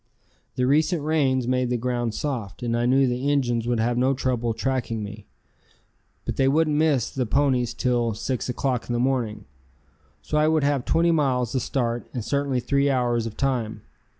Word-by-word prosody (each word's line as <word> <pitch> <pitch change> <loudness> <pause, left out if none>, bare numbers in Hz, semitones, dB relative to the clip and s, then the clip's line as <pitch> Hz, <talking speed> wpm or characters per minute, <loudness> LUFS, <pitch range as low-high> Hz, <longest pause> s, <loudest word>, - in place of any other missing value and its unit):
The 125 - +1
recent 155 +4 +2
rains 135 -5 +1
made 125 -1 +1
the 125 - 0
ground 120 -2 -2
soft, 125 -7 -4
and 115 -1 0
I 120 +1 +1
knew 135 +2 +4
the 125 +2 -1
Injuns 120 -5 0
would 120 -1 +1
have 120 +2 +1
no 130 +2 +2
trouble 125 -3 -1
tracking 115 -3 -2
me. 105 0 -9 1.0
But - - -3
they 135 - +3
wouldn't 155 +2 +2
miss 150 -6 +2
the 130 -3 -2
ponies 130 -2 +1
till 120 -3 0
6 125 +3 -3
o'clock 125 -1 -2
in - - 0
the 120 - 0
morning, 125 -4 -1 0.8
so 150 - 0
I 155 - +3
would 155 -2 +2
have 140 -3 +1
twenty 170 +1 +3
miles 130 -7 +1
the 130 - +1
start 120 -3 -2
and 120 -4 -3
certainly 140 -2 0
three 140 +3 +1
hours 120 -3 +1
of 110 - -9
time. 120 -6 -1
125 Hz, 185 wpm, -24 LUFS, 120-140 Hz, 1.0 s, knew